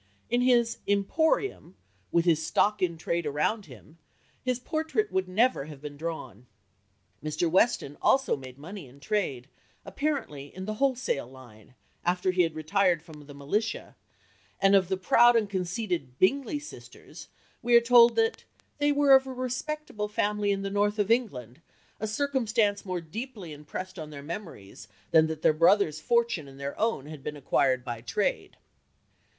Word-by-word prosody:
In 240 +1 +2
his 240 -2 +3
"emporium," 205 - 0 0.4
with 170 0 +2
his 160 -2 +3
stock 210 +6 +1
in 170 -3 0
trade 170 0 -2
around 150 +9 -1
him, 150 +6 -15 0.4
his 255 -1 0
portrait 320 - -2
would 190 0 0
never 210 - +2
have 150 -2 -10
been 145 0 -8
drawn. 140 -7 -6 0.8
Mr. 155 +3 -1
Weston 165 - +1
also 265 0 +3
made 130 -2 -11
money 170 +2 -9
in 130 +3 -17
trade, 140 - -2 0.4
apparently 275 - -3
"in 185 0 -6
the 215 - -3
wholesale 260 - 0
line," 125 -3 -16 0.3
after 180 +1 +1
he 180 0 +2
had 165 -2 0
retired 170 +1 +1
from 150 -3 -13
the 145 - -11
militia, 205 +11 -3 0.6
and 195 0 +4
of 190 -2 +4
the 190 - 0
proud 235 +6 +5
and 225 -2 +2
conceited 175 - -3
Bingley 275 - +2
sisters 295 +1 -12 0.3
we 240 0 +3
are - - +10
told 235 0 +6
that 450 0 +1 0.4
"they 290 0 +3
were 285 -1 +5
of 265 0 +6
a 260 - -5
respectable 255 -2 -4
family 210 0 0
in 195 -1 0
the 195 - -3
north 205 +1 +1
of 205 +1 +1
England; 140 - -1 0.4
a 215 - -2
circumstance 225 -4 0
more 185 -3 -3
deeply 200 - -7
impressed 180 +5 -7
on 155 -1 -7
their 140 -2 -9
memories 150 - -8 0.2
than 160 -1 +5
that 160 0 -6
their - - +5
brother's 165 -1 +3
fortune 235 - +1
and 135 0 -13
their 140 0 -4
own 220 -11 0
had 155 -1 -9
been 150 0 -5
acquired 130 -2 +1
by 120 -3 -5
trade." 120 - -2
185 Hz, 165 wpm, -28 LUFS, 150-235 Hz, 0.8 s, are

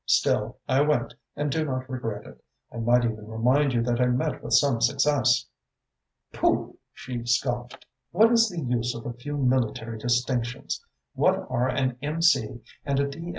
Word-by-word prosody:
"Still, - - +1
I 130 +2 +3
went 150 +1 +1 0.2
and 145 0 -1
I - - 0
do - - +1
not 130 -3 -3
regret 120 -5 -5
it. - - -14 0.3
I - - -7
might 120 +1 +3
even 110 -2 -4
remind 125 +6 +2
you 120 -2 +1
that 120 0 0
I 125 - +4
met 125 0 -1
with - - -3
some 135 -5 +3
success." 135 0 +2 0.9
"Pooh!" - - 0
she 125 -2 -6
scoffed. 120 0 -1 0.2
"What 220 +6 +4
is 230 -1 +4
the 175 -3 -5
use 120 -2 -1
of 115 - -8
a 120 - -4
few 145 +5 -6
military 120 -4 0
distinctions? 120 +1 -1 0.3
What - - +3 0.2
are 125 0 +1
an 130 -1 -1
M.C. 145 -7 +1 0.2
and 140 -1 0
a 140 - +1
D. 165 +5 -7
125 Hz, 175 wpm, -26 LUFS, 120-140 Hz, 0.9 s, I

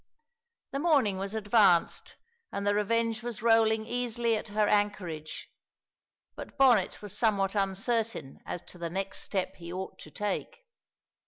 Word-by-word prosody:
The 275 - -2
morning 280 - +3
was 195 +2 -4
advanced 205 -5 +3 0.4
and 200 - -3
the 205 - +3
Revenge 230 +2 +1
was 240 -2 -5
rolling 225 -1 +4
easily 240 -1 0
at 215 - -4
her 210 0 +1
anchorage, 185 -7 -1 0.9
but - - -9
Bonnet 245 -9 +4
was 205 - -6
somewhat 200 -4 +1
uncertain 200 - -1
as 175 - -5
to 180 - -11
the 170 -1 -3
next 195 +3 -3
step 190 -1 -3
he 170 -1 -8
ought 185 +1 -6
to - - -10
take. 210 - -4
210 Hz, 145 wpm, -29 LUFS, 195-230 Hz, 0.9 s, rolling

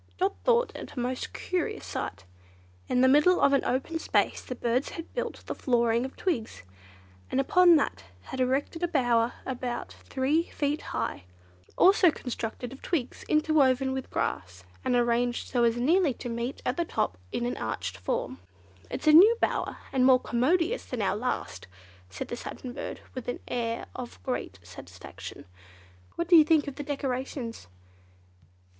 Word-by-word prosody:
Dot 385 +2 +1
thought 485 0 +2
it - - -8
a 260 - -5
most 250 +1 -3
curious 370 +4 -3
sight. 95 0 -5 0.6
In 250 - +3
the 260 - +6
middle 300 +7 +5
of 280 - +4
an 275 - +3
open 275 +6 -1
space - - +1
the 255 - -6
birds 245 +2 0
had 330 - -8
built - - -4
the - - -3
flooring 235 -1 +1
of 265 - -8
twigs, 255 - -2 0.7
and - - 0
upon 350 +5 +6
that 295 - +1
they 90 +1 -20
had 265 - -5
erected 265 +6 0
a 350 - +2
bower 245 -6 +2
about 250 -2 -4
three 290 +6 0
feet 290 +1 -1
high, 115 -5 -4 0.5
also 375 -1 +6
constructed 245 -3 -5
of 270 - -13
twigs 285 -9 -2
interwoven 275 -4 +3
with 265 -1 -4
grass, 90 -1 -3 0.2
and 250 - +1
arranged 240 0 +1
so 245 -2 +1
as 235 0 +3
nearly 300 +2 +3
to 245 - -6
meet 235 +3 -4
at 250 - 0
the 345 - +2
top 90 - -1 0.2
in 240 - -2
an 245 - -2
arched 95 -5 -3
form. 90 -1 -3 0.5
"It's - - -5
a 305 - +6
new 415 +9 +8
bower, - - -1 0.2
and 260 -2 +3
more 255 0 +6
commodious 330 - +1
than 240 -4 -3
our 190 - +1
last," 215 - -3 0.4
said 95 - -6
the - - -3
Satin 245 +1 -7
Bird - - -6
with 255 - -7
an 245 - -2
air 230 -1 -2
of 250 -2 -7
great 250 - -3
satisfaction. 90 0 -10 0.7
"What 340 - -2
do 350 - +6
you 320 - +9
think 310 -1 +3
of 280 - -6
the 290 - -4
decorations?" 260 - -4
255 Hz, 170 wpm, -28 LUFS, 235-305 Hz, 0.7 s, you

